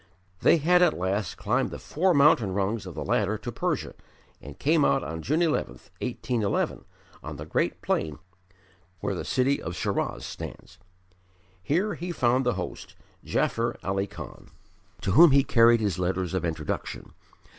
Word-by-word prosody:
They - - +5
had 180 +4 +4
at 175 -3 +4
last 95 +2 -2
climbed - - 0
the - - -7
four 180 +3 +1
mountain 130 -9 +4
rungs 100 +1 -1
of 90 - -8
the 75 - -4
ladder - - +1
to - - -6
Persia, - - -2 0.5
and 70 0 -10
came 155 +1 +2
out 135 -1 +2
on 80 0 -5
June 155 - 0
11th, 150 - -1
1811, 115 -3 -1 0.4
on 75 - -6
the 75 +1 -7
great 80 - -1
plain 75 -3 -1 0.8
where - - -2
the - - -4
city 135 +2 +1
of 85 +1 -5
Shiraz - - -2
stands. - - -9 0.8
Here 180 - 0
he 175 +1 -5
found 125 -4 +1
the 125 - +3
host 90 - -6 0.3
Jaffir 115 +1 0
Ali 95 +1 -1
Khan, - - -10 0.5
to 95 - -1
whom 165 - +8
he 140 0 +5
carried 115 -2 +5
his 100 -4 -1
letters 90 -1 -1
of 95 -2 -1
introduction. 80 -2 -4
115 Hz, 160 wpm, -26 LUFS, 90-140 Hz, 0.8 s, whom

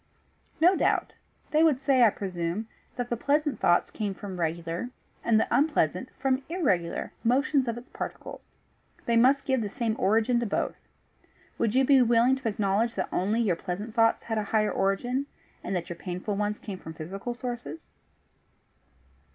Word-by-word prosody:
"No 355 +4 +5
doubt. - - +1 0.4
They 310 +1 +4
would 305 -6 +4
say, 270 -1 +3
I 230 - +7
presume, 185 +1 -3 0.3
that 245 -1 -4
the - - +2
pleasant 290 +4 0
thoughts 175 - +3
come 205 -3 -3
from 190 -2 -7
regular, 170 +6 -2 0.3
and 225 -2 +4
the - - +2
unpleasant 300 +2 +1
from 265 0 +1
irregular 195 - 0
motions 265 +2 +2
of 235 0 -2
its 245 +2 -10
particles. - - -7 0.6
They 235 - +1
must 260 +4 +4
give 265 -2 +1
the 210 - -3
same 230 -1 -1
origin 225 +2 +3
to 235 - -1
both. - - -2 0.8
Would 225 +1 +1
you 265 0 +4
be 270 -1 +6
willing 240 +2 +4
to 260 -4 -2
acknowledge 210 +3 0
that - - -2
only 210 +6 +1
your 200 -7 +2
pleasant 200 +6 -5
thoughts 225 0 +3
had 225 -1 -2
a 210 - -2
higher 215 0 +1
origin, 245 +8 0 0.4
and 195 - -3
that 175 -2 -2
your 170 - -6
painful 180 +3 -4
ones 210 +1 -1
came 195 -4 -7
from 160 -2 -9
physical 195 +10 -5
sources?" 240 - -6
225 Hz, 170 wpm, -27 LUFS, 195-255 Hz, 0.8 s, I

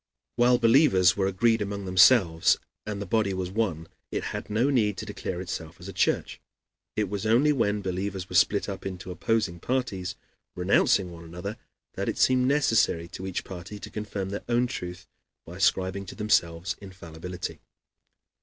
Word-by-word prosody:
While 125 +1 +4
believers 115 - +5
were 95 -1 +1
agreed 115 +4 +2
among 100 -1 -3
themselves 90 -2 +5 0.3
and 105 -1 -3
the 100 - -4
body 100 0 +1
was 95 -1 -3
one, 95 -7 -1 0.2
it - - -2
had - - -5
no 115 +7 +2
need 105 -7 +2
to 110 - -5
declare 100 -3 -5
itself 85 -3 -6
as - - -10
a - - -7
church. - - 0 0.5
It 105 -1 0
was 100 +2 -3
only 130 +7 +4
when 105 -6 0
believers 95 0 -3
were - - -10
split - - +3
up - - -5
into 90 -1 -6
opposing 95 -2 -1
parties, 100 -6 -2 0.4
renouncing 90 0 +2
one 85 -1 -10
another, 90 +5 -6 0.4
that - - -2
it - - -3
seemed 130 0 +3
necessary 115 - +2
to 95 +1 -7
each 95 - -3
party 95 +2 -8
to - - -9
confirm 100 -2 -4
their 100 - -4
own 120 +1 +3
truth 90 -6 -6 0.4
by 90 +2 -9
ascribing 95 0 +1
to - - -8
themselves 85 -5 +1
infallibility. 90 -2 -7
100 Hz, 170 wpm, -27 LUFS, 90-110 Hz, 0.5 s, believers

